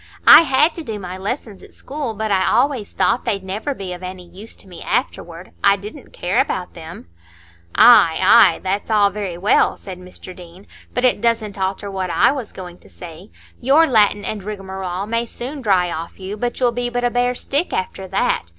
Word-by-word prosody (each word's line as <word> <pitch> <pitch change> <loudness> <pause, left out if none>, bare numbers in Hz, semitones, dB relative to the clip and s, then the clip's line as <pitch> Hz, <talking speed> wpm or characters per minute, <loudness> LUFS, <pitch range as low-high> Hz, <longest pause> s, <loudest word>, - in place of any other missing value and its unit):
I - - +10
had 300 +1 +2
to 330 - -7
do 220 -6 -5
my 185 -2 -7
lessons 205 +1 -5
at - - -16
school, 275 -5 -6
but 215 0 -3
I 190 -1 +2
always 265 -7 0
thought 235 +2 0
they'd 200 -5 -2
never 215 +9 -4
be 190 -4 -6
of 180 - -10
any 180 -1 -8
use 205 +6 -12
to - - -16
me 180 -2 -11
afterward; 180 -7 -3
I 200 - +5
didn't 210 +7 -11
care 180 +2 0
about 180 - -4
them." 165 - -11 0.7
"Ay, 170 -9 +6
ay, 215 +5 +6
that's 195 +3 -2
all 205 -2 +3
very 195 -4 -5
well," 195 +4 +2
said 185 -2 -9
Mr 180 0 -11
Deane; 180 +2 -14 0.3
"but 245 - +1
it 245 -4 +2
doesn't 225 -3 0
alter 195 +1 -3
what 190 -1 -3
I - - +3
was 265 -6 -6
going 180 -2 -10
to 95 - -20
say. 160 - -12 0.3
Your 280 +6 +4
Latin 210 -6 +2
and 210 -3 -4
rigmarole 190 -2 -5
may 230 +2 -2
soon 270 +5 -7
dry 185 -6 +1
off 165 +3 -7
you, 190 +2 -6
but 240 +3 -4
you'll 245 -2 +2
be 245 +1 -3
but 245 0 -3
a 245 - +1
bare 245 +1 0
stick 285 +7 -2
after 190 +1 -4
that. 185 - -1
200 Hz, 205 wpm, -19 LUFS, 185-240 Hz, 0.7 s, I